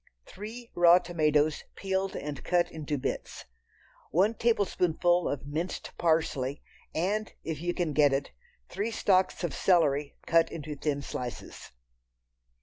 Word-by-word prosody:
Three 225 +5 -9
raw 175 0 +7
tomatoes, 155 -4 +1
peeled 190 0 -2
and 145 -1 -5
cut 175 -1 +1
into 150 -2 -3
bits. 130 - -4 0.6
One 195 +6 +3
tablespoonful 180 -6 +2
of 140 -1 -4
minced 160 +5 -4
parsley, 160 -5 0 0.3
and, 205 +6 0
if 160 -2 -4
you 175 0 -1
can 170 -5 -1
get 145 -1 +5
it, 135 +1 -1 0.4
three 210 +3 -2
stalks 190 -5 +2
of 175 - -1
celery 150 -6 +2
cut 165 0 +3
into 150 -2 -6
thin 145 -1 -2
slices. 125 -3 -6
165 Hz, 130 wpm, -29 LUFS, 150-185 Hz, 0.6 s, raw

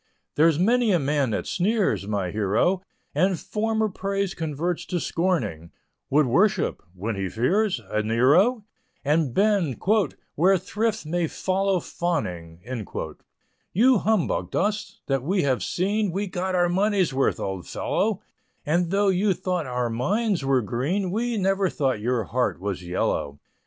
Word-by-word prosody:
There's 160 0 +4
many 230 +5 +3
a 180 - +4
man 140 -3 +1
that 110 - -2
sneers, 195 - 0
my 100 -4 -1
hero, 110 - +1 0.3
And 180 +4 +2
former 220 0 0
praise 195 -1 -2
converts 160 +2 -2
to 180 - -1
scorning, 120 - -1 0.4
Would 150 +2 +4
worship 180 - +2
when 105 +4 -3
he 95 -1 -2
fears 180 - +1
a 105 0 0
Nero, 150 - +3 0.4
And 150 -1 +2
bend 195 - +1 0.5
"where 190 +5 +4
thrift 215 +2 -2
may 170 +2 0
follow 190 +2 0
fawning." 90 - -3 1.1
You 240 +4 +5
humbugged 215 -4 0
us 210 +2 -1
that 135 -2 0
we 185 +7 0
have 130 -3 +1
seen, 200 +2 0
We 195 +4 -2
got 185 0 -2
our 175 -1 +3
money's 190 -2 +1
worth, 135 +1 +1
old 95 -3 -4
fellow, 210 -1 -1 0.4
And 170 +3 +1
though 200 +2 +2
you 190 +1 +2
thought 180 -5 -2
our 125 -1 -1
minds 190 - 0
were 135 -2 +2
green, 160 - -1
We 230 +3 -1
never 195 -1 +1
thought 135 -9 0
your 120 0 0
heart 125 +1 -1
was 95 -1 -3
yellow. 75 -5 -2
175 Hz, 145 wpm, -25 LUFS, 125-195 Hz, 1.1 s, You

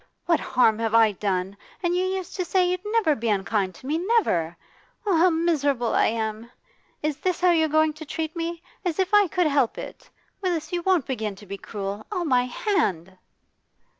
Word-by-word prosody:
What 335 -2 +3
harm 240 -4 +2
have 225 -1 0
I 225 -2 +6
done? 190 -1 -2 0.3
And 350 0 +1
you 365 - +1
used 375 -1 -3
to 365 - 0
say 360 +1 +2
you'd 365 +1 -2
never 425 -7 +2
be 235 -4 -2
unkind 195 -2 0
to 255 - -15
me, 305 +4 0
never! 260 - +1 0.5
Oh, 395 -4 +2
how 345 +3 +5
miserable 290 -7 +1
I - - +4
am! 220 0 -3 0.5
Is 300 -2 -1
this 365 +3 -1
how 360 -1 +5
you're 320 -2 +3
going 310 +1 +3
to 310 +1 -10
treat 315 +2 -4
me? 335 0 -4 0.2
As 350 -4 -1
if 380 +2 0
I 415 -1 +6
could 360 +1 +1
help 280 -5 +2
it! - - -9 0.3
Willis, 340 -4 -2
you 350 - 0
won't 360 -6 +2
begin 220 -6 -3
to 205 - -14
be 200 0 -7
cruel? 200 0 -6
Oh, 365 -4 -1
my 250 -4 +3
hand! 195 - -1
310 Hz, 195 wpm, -25 LUFS, 220-355 Hz, 0.5 s, I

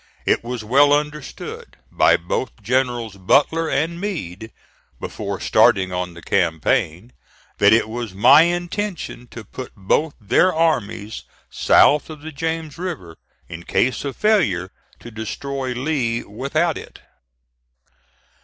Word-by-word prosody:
It - - +2
was 120 -1 -5
well 140 +6 +4
understood, 150 -1 -4
by - - +4
both 105 +6 -4
Generals 120 -3 -1
Butler 150 - +2
and 170 +4 -1
Meade, 110 - -5 0.5
before - - -5
starting 95 -1 +3
on 90 -1 -3
the 85 - -12
campaign, 85 +5 0 0.5
that 100 0 +6
it 110 0 +4
was 115 -1 -5
my 130 +9 +7
intention 175 - -2
to 115 -1 -10
put 125 +4 -9
both 145 +10 0
their 120 - +3
armies 115 - -1 0.3
south 150 +2 +4
of 155 -2 -9
the 160 +1 -7
James 160 +1 -4
River, 160 - -6 0.3
in 80 - -8
case 125 +8 0
of 140 -2 -4
failure 105 - +1 0.3
to 120 - -10
destroy 130 +5 -4
Lee 125 -4 -1
without 125 +7 -1
it. - - -13
125 Hz, 125 wpm, -21 LUFS, 105-155 Hz, 0.5 s, my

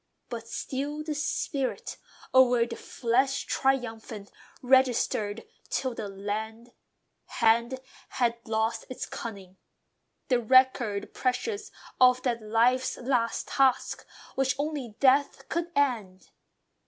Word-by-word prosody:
But 230 -2 -6
still 285 +5 -4
the 305 0 -3
spirit, 280 -2 -2 0.4
o'er 250 -2 +5
the 235 -1 -6
flesh 260 +5 0
triumphant, 225 -6 -2 0.3
Registered 245 -4 +2 0.2
till 260 -2 -1
the 220 +3 -5 0.5
"hand 235 +3 +2 0.3
had 235 -2 0
lost 225 0 -1
its 255 - -5
cunning," 195 -5 -8 0.7
The 250 -2 +3
record 245 -4 +3
precious 405 - -2 0.3
of 255 0 +5
that 235 -3 0
life's 240 +4 +2
last 240 -2 0
task, 270 -2 +2 0.3
Which 270 0 +1
only 285 -6 -3
death 275 +1 +3
could 340 +1 -2
end.... 220 -10 -1
245 Hz, 105 wpm, -28 LUFS, 225-265 Hz, 0.7 s, o'er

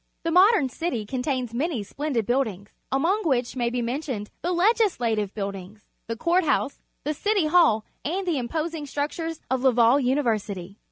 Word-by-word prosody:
The 330 - 0
modern 375 - +5
city 255 -5 -3
contains 255 0 -2
many 270 -2 -1
splendid 265 +1 -2
buildings, 220 -5 -1 0.2
among 335 +11 +2
wliich 260 -7 0
may 240 -2 0
be 240 0 -2
mentioned 240 -4 -3
the 350 - -1
Legislative 345 - +2
Buildings, 200 0 -6 0.2
the 230 0 -3
Court 350 +6 +2
House, 285 -2 0 0.2
the 300 - -1
City 405 +2 +1
Hall, 305 -10 +4 0.2
and 370 +6 -2
the 335 -6 0
imposing 310 +4 -3
structures 310 +3 -3
of 260 -1 +1
Laval 245 0 +5
University. 220 -8 -1
270 Hz, 155 wpm, -25 LUFS, 230-330 Hz, 0.2 s, modern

